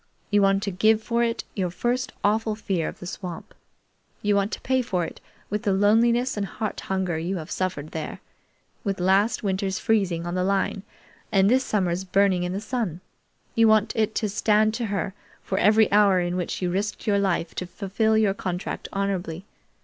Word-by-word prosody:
You 205 0 +4
want 195 0 +3
to 200 - -1
give 215 +4 +3
for 235 +1 0
it 230 -1 -1
your 185 -3 -1
first 245 +8 -1
awful 215 +1 +1
fear 190 -6 -2
of - - -6
the - - -9
swamp. 180 -1 -7 0.7
You 205 0 +3
want 200 +2 +1
to - - -5
pay 260 0 +1
for 180 -8 -1
it - - -9 0.3
with 210 0 -1
the 200 - +1
loneliness 235 +5 +3
and 200 -2 -2
heart 215 +1 -4
hunger 185 -4 -2
you 180 +4 -2
have 160 -2 -7
suffered 180 -5 -2
there, 160 - -5 0.6
with 195 -3 -2
last 195 +6 +2
winter's 195 0 -1
freezing 195 -7 +1
on 175 - -3
the 180 0 0
line 195 0 0 0.5
and 195 +1 +4
this 260 +1 +4
summer's 185 -5 0
burning 190 -1 +2
in 180 0 -2
the 190 - -2
sun. 215 -8 -3 0.5
You 230 0 +5
want 215 0 +3
it 220 -1 0
to 215 - 0
stand 215 +1 +2
to 230 0 -2
her 200 -1 -2 0.3
for 190 - -1
every 215 +2 +4
hour 200 -2 +5
in 175 0 -1
which 180 +1 -3
you 175 - 0
risked 205 +3 -2
your 200 -2 +2
life 180 -4 0
to 180 - -4
fulfill 210 +4 0
your 210 -3 +3
contract 180 -2 -4
honorably. 195 -3 -2
200 Hz, 195 wpm, -25 LUFS, 185-215 Hz, 0.7 s, You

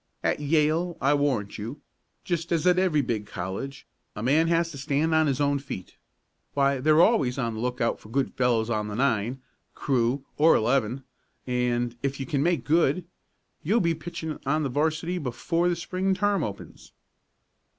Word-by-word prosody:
"At - - +1
Yale, 155 +3 +1
I 140 +2 +3
warrant 130 -9 0
you, 115 +8 -6 0.4
just 170 -1 -2
as 170 0 +1
at 180 0 +5
every 175 -6 +2
big 110 -5 -3
college, 100 +11 -5 0.3
a 105 - -5
man 150 +6 +3
has 165 0 +1
to 140 - -8
stand 145 +3 0
on 160 -1 +4
his 135 -1 0
own 140 -1 +2
feet. 130 -9 -8 0.6
Why, 140 -1 +2
they're 155 +4 +4
always 140 - +2
on 120 -4 -1
the 110 - -6
lookout 125 -1 -1
for 105 - -15
good 135 +3 -1
fellows 120 -3 +1
on 105 -3 -1
the 105 - -5
nine, 125 0 0 0.3
crew 130 0 0
or 160 +2 +6
eleven, 125 +2 +1 0.4
and, 120 -1 0
if 140 0 -2
you 135 - -3
can 140 +1 -1
make 165 -4 +1
good, 165 +2 +2 0.6
you'll 210 +9 +2
be 170 -4 +2
pitching 160 -1 -6
on 150 +3 +1
the 140 - -1
'varsity 160 +6 -1
before 165 +5 -1
the 175 - +1
Spring 185 +3 -1
term 200 -2 +1
opens." 100 -2 -8
140 Hz, 175 wpm, -26 LUFS, 125-165 Hz, 0.6 s, or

